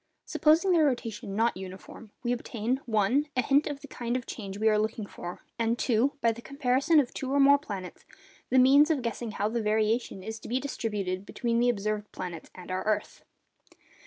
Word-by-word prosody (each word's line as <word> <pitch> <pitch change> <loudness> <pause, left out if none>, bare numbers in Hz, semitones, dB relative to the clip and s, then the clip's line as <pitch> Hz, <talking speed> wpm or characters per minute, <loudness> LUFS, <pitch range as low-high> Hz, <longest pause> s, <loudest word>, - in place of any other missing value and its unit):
Supposing 325 +5 +3
their 335 -3 +5
rotation 225 -6 -2
not 230 +2 +2
uniform, 190 +4 -10
we 240 - 0
obtain—(1) 240 +2 0
a - - +5
hint 280 +5 +3
of 290 -2 -5
the 290 - -10
kind 240 -1 -2
of 250 - -6
change 200 -3 -6
we 220 +1 +1
are 215 -1 +4
looking 215 0 -2
for; 175 -3 -8 0.2
and 230 +1 +1
(2), 245 +3 +2
by 230 - +4
the 230 +1 -8
comparison 275 +4 +2
of 260 -4 0
two 265 -1 -4
or 280 - +2
more 280 +1 +6
planets, 195 -10 -7 0.5
the 260 - +3
means 275 +4 +6
of 295 -6 +1
guessing 235 0 -3
how 205 - 0
the 230 +2 -1
variation 215 -1 0
is 220 +2 -6
to - - -10
be 250 +2 +1
distributed 205 -8 -3
between 235 +3 -1
the 245 +1 +3
observed 210 -2 -2
planets 175 -3 -7
and 185 0 -9
our 185 0 -1
earth. 210 -1 -2
230 Hz, 195 wpm, -28 LUFS, 210-265 Hz, 0.5 s, more